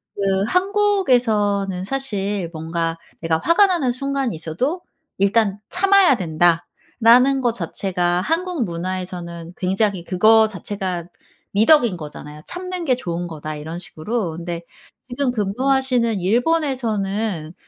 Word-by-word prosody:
그 195 -1 0
한국에서는 245 - +1
사실 205 -6 -1
뭔가 165 +1 -2 0.2
내가 165 -1 +1
화가 395 +4 +5
나는 335 -9 +1
순간이 275 -2 -2
있어도 180 - -2 0.4
"일단 200 0 +2
참아야 385 -4 +5
된다."라는 220 +9 +2
거 240 -2 +2
자체가 180 -3 -1
한국 330 - -1
문화에서는 175 -1 -5
굉장히 190 0 0
그거 220 +5 +4
자체가 190 -3 -4 0.5
미덕인 230 0 +4
거잖아요. 150 -1 -9
"참는 365 -1 -5
게 260 -4 +3
좋은 175 -7 -4
거다." 155 -2 -6
이런 155 +3 -6
식으로. 185 +3 -3
근데 170 0 -5 0.5
지금 255 +1 -1
근무하시는 245 +1 +1
일본에서는 220 - 0
205 Hz, 280 characters per minute, -21 LUFS, 175-265 Hz, 0.5 s, 화가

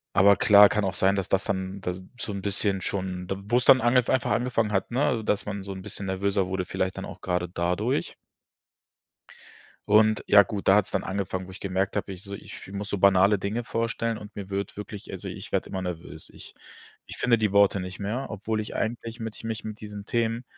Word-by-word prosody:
Aber 100 +1 +6
klar, 105 -1 +8
kann 105 -1 0
auch 95 -1 -1
sein, 95 +2 +3
dass 95 - -2
das 95 0 +1
dann 95 0 -3
da 90 - -1 0.3
so 105 - -4
'n 100 - -4
bisschen 100 0 -1
schon 90 -1 -3
d 95 - -3
wo 120 +4 +2
es 125 - -2
dann 130 - +8
ange 120 +2 +4
einfach 130 - +1
angefangen 115 -3 +1
hat, 95 - 0
ne, 125 -2 +1
dass 105 - 0
man 100 -1 -4
so 100 0 -6
'n 95 -1 -7
bisschen 100 - -8
nervöser 95 0 0
wurde, 95 -1 -2
vielleicht 95 +2 -2
dann 95 - -5
auch - - -9
gerade 90 -1 -1
dadurch. 85 0 -1 1.7
Und 110 +1 +4
ja 100 -1 +8
gut, 100 +1 -4
da 95 - +7
hat's 105 0 +2
dann - - -1
angefangen, 95 -1 -3
wo - - -11
ich 95 - -11
gemerkt 95 +1 -1
habe, 100 -1 -2
ich 95 +1 -10
so 100 -1 -7
ich - - -9
fü 95 - -12
ich - - -5
muss 100 0 -5
so 100 - -1
banale 100 +1 +5
Dinge 105 +5 -3
vorstellen 115 0 -2
und 105 0 -12
mir 100 -1 -7
wird 100 +1 -3
wirklich 105 -1 -8
also, - - -6
ich - - -8
werde - - -1
immer 95 - -3
nervös. 85 -3 -7
Ich - - -14 0.5
ich - - -9
finde 120 -2 +3
die 105 -2 +1
Worte 100 -1 +4
nicht 90 0 -7
mehr, 115 +7 -3
obwohl 110 +1 -3
ich 105 - -6
eigentlich 115 +1 -3
mich 110 0 -7
mich 110 -1 -4
mit 110 -1 -7
diesen 105 -1 -8
Themen 115 +1 -1
100 Hz, 230 wpm, -26 LUFS, 95-110 Hz, 1.7 s, klar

